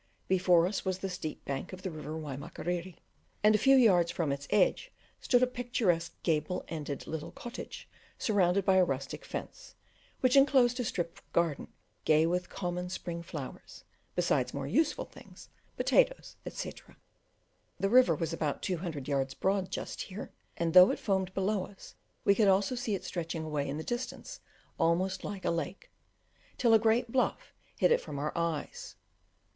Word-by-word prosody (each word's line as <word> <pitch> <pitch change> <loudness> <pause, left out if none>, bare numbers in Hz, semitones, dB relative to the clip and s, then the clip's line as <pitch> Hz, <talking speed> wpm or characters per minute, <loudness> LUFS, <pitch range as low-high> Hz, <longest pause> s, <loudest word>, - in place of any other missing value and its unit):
Before 180 -2 +4
us 195 +3 -2
was 185 -1 -1
the 190 0 -4
steep 155 -3 -6
bank 140 +5 -4
of 185 0 -9
the 185 - -3
river 155 -1 -6
Waimakiriri, 160 +4 -4 0.5
and 210 +1 +6
a 215 - +3
few 270 +4 +6
yards 190 -10 +5
from 165 -4 -1
its 140 0 -4
edge 210 - +2 0.3
stood 250 -1 +3
a - - +7
picturesque 235 -9 -1
gable 160 +2 0
ended 150 -4 -5
little 160 -1 -5
cottage 240 - -8 0.3
surrounded 195 -3 +2
by 190 -1 +4
a 185 - +6
rustic 135 -4 -3
fence, - - -7 0.5
which 255 0 +4
enclosed 265 -3 +5
a - - +1
strip 175 -6 -3
of - - -32
garden 170 -4 +1 0.4
gay 155 +1 +4
with 180 +2 -1
common 180 -1 -3
English 180 +1 -4
spring 170 -1 -5
flowers, 150 -5 -8 0.3
besides 150 -8 +1
more 140 -1 -3
useful 290 - +1
things, - - -15 0.3
potatoes, - - +2
etc. - - -7 0.8
The 195 - +2
river 255 +3 +6
was 165 -1 -2
about 155 -3 -2
two 185 - -1
hundred 160 -6 -5
yards 135 -2 -1
broad 190 -1 0
just - - -5
here, 195 +2 -7 0.3
and 165 -1 0
though 180 +1 +10
it - - 0
foamed 190 -2 0
below 195 0 0
us, 195 - -14 0.3
we 200 - +6
could 210 0 +3
also 195 +4 +3
see 240 -4 -1
it 190 - -6
stretching 165 -2 -3
away 150 -3 -2
in 145 - -3
the 160 - -4
distance 240 +5 -5 0.4
almost 180 +3 +1
like 200 -2 -5
a - - +2
lake, 170 +2 -4 0.7
till 235 -2 +4
a 220 - +7
great 225 +2 +2
bluff 255 0 0 0.2
hid - - +3
it 480 - +4
from 145 - -7
our 150 +2 -3
eyes. 170 -3 -3
180 Hz, 175 wpm, -31 LUFS, 160-210 Hz, 0.8 s, though